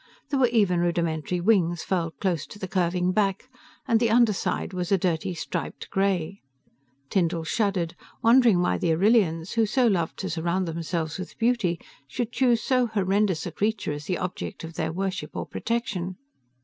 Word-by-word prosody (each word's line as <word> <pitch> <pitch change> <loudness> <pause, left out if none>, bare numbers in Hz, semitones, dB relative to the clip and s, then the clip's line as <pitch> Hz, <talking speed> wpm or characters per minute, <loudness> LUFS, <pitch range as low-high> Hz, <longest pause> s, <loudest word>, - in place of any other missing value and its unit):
There 275 - +1
were 255 - +5
even 205 -7 +2
rudimentary 170 0 0
wings 175 -4 +2
furled 165 -4 -2
close 175 -6 -1
to - - -11
the 190 - -5
curving 180 -2 +1
back, 195 +2 0 0.4
and 230 -3 +4
the 235 -1 +2
underside 220 -4 +2
was 180 0 -3
a 195 - +5
dirty, 175 0 -1
striped - - -5
gray. 195 -1 0 0.7
Tyndall 170 -3 +1
shuddered, 180 -1 0 0.3
wondering 230 -5 +6
why 180 - +1
the 165 - +2
Arrillians, 180 -3 +2
who 225 -2 +2
so 255 +4 +2
loved 180 -8 +1
to 190 - -3
surround 170 +3 -1
themselves 165 0 -3
with 185 - -7
beauty, 225 -8 +1 0.3
should 240 - -3
choose 245 -2 +2
so 255 -2 +2
horrendous 200 -4 +1
a - - -4
creature 210 -5 -1
as 145 0 -5
the 180 - -1
object 180 -1 -5
of 165 0 -7
their 160 -1 -2
worship, 190 +2 -3
or - - -3
protection. 190 -6 -3
185 Hz, 170 wpm, -26 LUFS, 170-220 Hz, 0.7 s, wondering